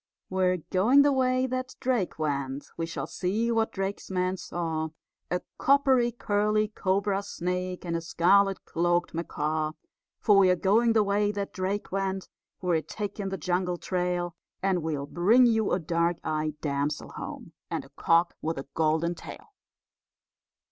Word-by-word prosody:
We're 185 -1 +2
going 240 +10 +5
the 290 - +4
way 255 -1 +2
that 255 0 -3
Drake 245 -8 0
went, 140 -3 -3
We 165 - -3
shall 170 - -4
see 215 +6 -1
what 225 -1 +1
Drake's 195 +1 -4
men 185 0 0
saw, 160 -3 -3 0.4
A 180 - 0 0.2
coppery 265 -3 +4
curly 215 -1 +1
cobra 195 -1 0
snake, 180 -1 -3
And 170 -1 -2
a 165 - -1
scarlet 195 +4 +3
cloaked 175 +1 0
macaw. 155 -1 -2 0.5
For 205 -3 +5
we're 185 -2 +5
going 220 +6 +3
the 220 -2 +4
way 205 +1 +1
that 200 -1 -4
Drake 190 +2 -2
went, 195 0 -2 0.3
We're 170 -3 +2
taking 205 +1 -4
the 195 - -3
jungle 180 +2 -1
trail, 180 -1 -2 0.3
And 190 -2 +2
we'll 150 -3 -2
bring 205 - +4
you 220 -3 +2
a - - +3
dark 170 0 0
eyed 155 -1 -2
damsel 145 0 -2
home, - - -8 0.2
And - - -3
a - - -17
cock 170 +1 +2
with 160 -1 -2
a 135 - -5
golden 160 +2 +1
tail. 305 - -11
185 Hz, 155 wpm, -28 LUFS, 170-205 Hz, 0.5 s, going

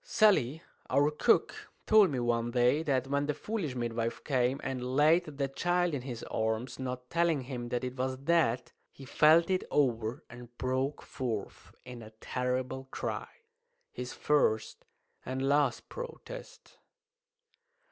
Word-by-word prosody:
Sally, 190 - +3 0.3
our 145 +3 +3
cook, 150 - +1 0.2
told 215 -3 +6
me 135 -4 -2
one 120 -1 0
day 125 +5 +3
that 135 -5 0
when 140 +1 0
the 150 - -1
foolish 195 - -3
midwife 115 -1 -2
came 130 -1 +1
and 130 -1 -3
laid 160 +5 +5
the 140 -2 -3
child 175 +4 0
in 140 - -2
his 120 -3 -6
arms, 110 +4 -2
not 125 -1 -5
telling 170 -4 +2
him 125 -2 -6
that 125 +1 -2
it 125 0 -4
was 130 0 -1
dead, 140 -4 +1 0.2
he 135 - -12
felt 160 +5 +5
it 185 - +1
over 120 -1 0
and 120 0 -13
broke 130 +3 -1
forth 115 -6 -5
in 125 -2 -9
a 110 - -10
terrible 130 +1 -2
cry - - -4 0.6
his 125 0 -6
first 110 -7 0 0.4
and 130 +1 -2
last 140 -4 +2
protest. - - -9
130 Hz, 145 wpm, -31 LUFS, 125-150 Hz, 0.6 s, told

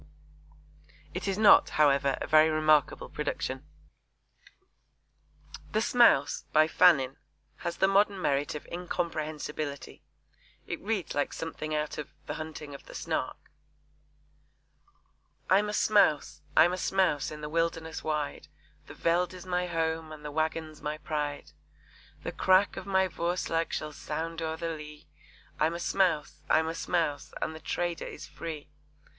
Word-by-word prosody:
It - - -4
is 195 0 0
not, 215 -1 +7
however, 140 -2 +4
a - - -3
very 155 +1 +6
remarkable 155 -2 +2
production. 135 -2 -3 2.1
The 215 - +3
Smouse, 230 - +4
by 155 0 +5
Fannin, 140 -6 +4 0.4
has 170 0 -4
the 195 - +4
modern 200 0 +3
merit 145 -3 0
of 150 - -7
incomprehensibility. 155 -5 -4 0.6
It 170 - -5
reads 210 -3 -2
like 145 - -1
something 155 -1 -4
out 150 0 -2
of 150 - -6 0.2
The - - -4
Hunting 155 -2 -7
of 140 - -11
the - - -11
Snark: - - -4 2.0
I'm 205 +2 +4
a - - -1
Smouse, 155 -9 +3 0.2
I'm 175 +2 +7
a - - -2
Smouse 180 -8 +1
in 150 0 -8
the 150 - -4
wilderness 165 0 -2
wide, 150 -2 -2 0.4
The 145 - -10
veld 175 +3 +1
is 180 0 -10
my 180 0 -1
home, 160 -1 -1
and 150 -1 -10
the 150 - -4
wagon's 155 0 -2
my 150 +1 -3
pride: 150 -2 -4 0.7
The - - -3
crack 190 +2 +3
of 190 - -7
my 190 -1 +3
'voerslag' 170 -1 -1
shall 150 0 -3
sound 165 +3 -4
o'er 160 0 -2
the 165 0 -3
lea, 150 -2 -8 0.5
I'm 160 +2 +2
a - - -4
Smouse, 170 -5 0
I'm 160 0 +4
a 165 - -2
Smouse, 165 -5 -1
and 160 - -2
the 160 - -9
trader 175 +1 -2
is - - -8
free! 155 -3 -7
160 Hz, 145 wpm, -29 LUFS, 150-175 Hz, 2.1 s, not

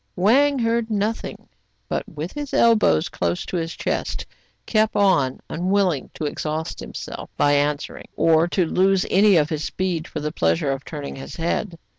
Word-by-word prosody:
Wang 270 +10 +4
heard 230 -1 0
nothing, 215 +1 -2 0.4
but, - - -2
with 155 +3 -6
his 290 -2 -4
elbows 215 - +4
close 85 0 -2
to - - -5
his 165 0 -3
chest, - - -2 0.4
kept 215 -1 +1
on, 180 -11 +3
unwilling 180 -3 0
to 155 - -4
exhaust 155 +2 -3
himself - - -7
by 145 0 +3
answering, 145 +1 -1
or 165 0 +4
to 180 0 +1
lose 190 +3 +2
any 200 +1 +5
of 155 0 +2
his 155 -1 -2
speed 175 -2 -2
for 155 - -5
the 150 0 -3
pleasure 85 - +1
of 135 0 -4
turning 145 -4 -7
his 135 - -8
head. 170 +2 -2
170 Hz, 165 wpm, -22 LUFS, 150-205 Hz, 0.4 s, any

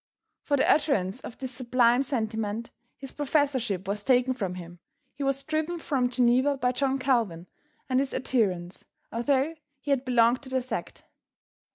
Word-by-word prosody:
For 285 - +1
the - - +2
utterance 255 -10 +2
of 245 - -9
this 260 -2 -5
sublime 250 -1 +3
sentiment 225 -4 -2 0.3
his 270 -1 -8
professorship 265 - 0
was 205 +1 -2
taken 255 +1 +3
from 195 -7 -3
him, 175 -1 -10 0.3
he 280 - -10
was 275 0 0
driven 315 +2 -1
from 270 -6 0
Geneva 255 +3 +3
by 250 -2 +1
John 270 +1 0
Calvin 230 -11 0 0.4
and 255 -1 +2
his 275 0 -1
adherents, 185 -9 -1 0.3
although 270 +6 +1 0.3
he 285 - -4
had 270 -2 +2
belonged 245 -1 +3
to 270 - -10
their 260 0 0
sect. 255 - -5
255 Hz, 160 wpm, -27 LUFS, 225-275 Hz, 0.4 s, sublime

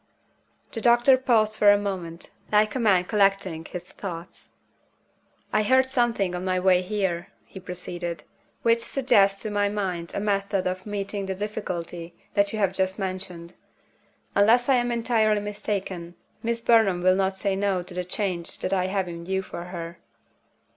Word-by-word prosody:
The 225 - -5
doctor 240 +3 +6
paused 225 -4 +2
for 205 -1 +7
a 205 - +5
moment, 185 -5 -5 0.2
like 215 0 +3
a 260 - -2
man 200 -6 +4
collecting 195 -4 +1
his 180 +1 -6
thoughts. 175 -3 -9 1.0
"I 215 - +4
heard 260 +4 +4
something 240 -8 0
on 180 0 -4
my 185 -1 0
way 180 -1 +4
here," 185 -3 -2 0.2
he 190 - -11
proceeded, 175 -2 -6 0.4
"which 230 0 +3
suggests 230 -6 +2
to 215 - -3
my 205 0 +1
mind 185 -5 -3
a - - 0
method 200 -2 0
of 185 +2 -3
meeting 200 -1 -3
the 190 - -2
difficulty 175 -4 -5 0.2
that 200 0 +2
you 220 - -4
have 195 -3 +1
just 190 0 0
mentioned. 185 -3 -5 0.8
Unless 230 +6 +4
I 265 - +5
am 245 0 0
entirely 225 -3 +2
mistaken, 200 -4 -4 0.3
Miss 235 0 -1
Burnham 220 -7 +3
will 185 0 +5
not 190 0 0
say 195 0 0
No 195 -2 0
to 180 - -9
the 180 0 -2
change 180 -2 -3
that 185 - -2
I 185 -1 +1
have 190 -1 -1
in 170 -1 -7
view 190 +1 -1
for 170 -2 -7
her." 170 -1 -7
195 Hz, 170 wpm, -25 LUFS, 180-215 Hz, 1.0 s, for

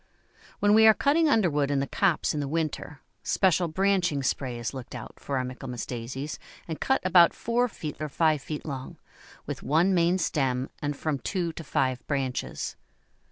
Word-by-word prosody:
When 205 0 +3
we 220 +1 +7
are 220 - +8
cutting 305 +3 +3
underwood 155 - +2
in 140 -1 +1
the 135 - 0
copse 175 +3 +1
in 150 - -2
the 145 - -2
winter, 155 -2 -3 0.2
special 185 -2 +2
branching 175 -4 +1
spray 130 -1 -1
is 120 +2 -4
looked 130 -3 -8
out - - -9
for 140 - -3
our 130 - 0
Michaelmas 125 -1 -6
Daisies 130 +5 -5 0.3
and 160 -2 -5
cut 265 - +2
about 175 -2 +6
four 240 +2 +1
feet 155 -9 -7
or 155 -1 -3
five 155 -1 +2
feet 150 +1 -6
long, 135 -4 -6 0.5
with - - -5
one 165 +6 +3
main 175 +1 +3
stem 135 -6 0
and 145 -2 -2
from 155 -3 -2
two 175 -1 -2
to 165 - -7
five 130 -3 0
branches. 135 -3 -2
155 Hz, 180 wpm, -27 LUFS, 135-185 Hz, 0.5 s, are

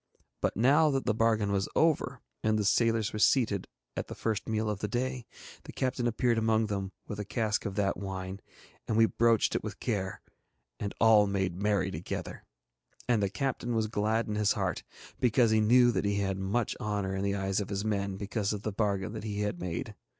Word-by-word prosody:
But - - 0
now 140 +7 +5
that 135 -2 -1
the 110 - +2
bargain 110 -2 +2
was 100 -1 0
over, 145 -5 +2 0.2
and 110 0 +2
the 105 - 0
sailors 115 +1 +2
were 105 - -3
seated 110 -5 +3 0.3
at - - -3
the - - -7
first 110 -2 -2
meal 110 0 0
of 105 -2 -2
the 105 - -2
day, 125 +2 -2 0.4
the - - -8
captain 130 -2 -1
appeared 120 0 +1
among 110 0 +2
them 100 -2 -3
with 105 - -6
a - - -1
cask 105 0 -1
of 95 - -6
that 100 -1 0
wine, 95 -1 -5 0.5
and 110 - 0
we 115 - +7
broached 115 -1 +2
it - - -1
with - - -6
care 95 -5 -2 0.6
and 100 - -4
all 110 -2 +6
made 95 -3 -1
merry 100 -2 +1
together. 80 +1 -5 0.6
And 120 -4 +2
the 100 - +1
captain 120 -1 -2
was 110 -1 +2
glad 110 +2 0
in 105 - -2
his 105 -1 +2
heart - - -2 0.4
because 120 -1 +3
he 110 0 +4
knew 120 +3 +5
that 110 - -1
he 100 0 +1
had 95 -1 -1
much 100 +4 -1
honour 100 -2 -2
in 95 - -2
the 100 0 0
eyes 95 0 0
of 100 - -4
his 100 +1 -2
men 100 -2 -1
because 100 +1 -2
of 105 0 -5
the 110 - -2
bargain 100 -1 -1
that 110 - -6
he 105 -1 -3
had 105 -4 -2
made. 90 +7 -4
105 Hz, 210 wpm, -30 LUFS, 100-115 Hz, 0.6 s, we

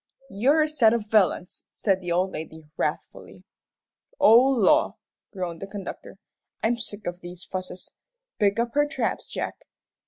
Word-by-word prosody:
"You're 275 +10 +3
a - - 0
set 260 -8 +4
of 215 -3 -3
villains!" 190 -4 +1
said 190 -3 +1
the 175 -1 -4
old 185 +2 +1
lady, 160 -1 -7
wrathfully. - - -4 0.8
"Oh, 225 +2 +8
law!" 270 +3 +3 0.4
groaned 180 -4 -5
the 195 - -5
conductor, 195 -1 -8 0.5
"I'm 235 +2 +2
sick 210 -3 -5
of 175 +1 -5
these 175 +1 -9
fusses. 185 -1 -7 0.5
Pick 200 -1 +2
up 235 0 -1
her 290 0 +3
traps, 290 - -2
Jack." - - -5
205 Hz, 150 wpm, -25 LUFS, 180-235 Hz, 0.8 s, Oh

